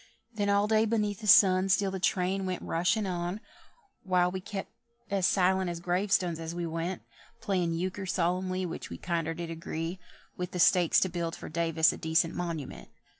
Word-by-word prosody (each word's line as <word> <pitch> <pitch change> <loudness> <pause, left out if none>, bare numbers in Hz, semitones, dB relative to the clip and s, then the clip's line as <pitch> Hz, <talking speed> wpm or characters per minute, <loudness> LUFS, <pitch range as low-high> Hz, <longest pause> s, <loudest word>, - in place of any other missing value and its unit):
Then 205 -2 -1
all 200 +1 +3
day 220 0 +3
beneath 210 -2 -1
the 210 - -5
sun 195 -2 +6
Still 195 0 +2
the 190 - -4
train 190 +1 0
went 185 -1 -3
rushin' 180 +6 0
on, 175 +1 -3 0.6
While 180 -2 +2
we 190 - -4
still 200 0 -4
kep' - - -31 0.4
as 195 -2 +2
silent 190 -1 +2
as 170 -1 -4
grave 180 +3 -1
stones 175 -4 +1
as 165 +1 -5
we 175 0 -3
went: 165 +3 -4 0.4
Playing 185 -6 0
euchre 185 +3 -3
solemnly, 185 +1 0
Which 170 - -6
we - - -7
kinder 165 -2 -2
did 170 0 -5
agree 165 +2 -5 0.4
With 180 0 -5
the 180 - -3
stakes 175 -1 +5
to 185 - +2
build 170 -1 -3
for - - -9
Davis 165 0 +2
a - - -7
decent 160 +1 +1
monu_ment_. 165 -6 -5
180 Hz, 190 wpm, -29 LUFS, 170-195 Hz, 0.6 s, sun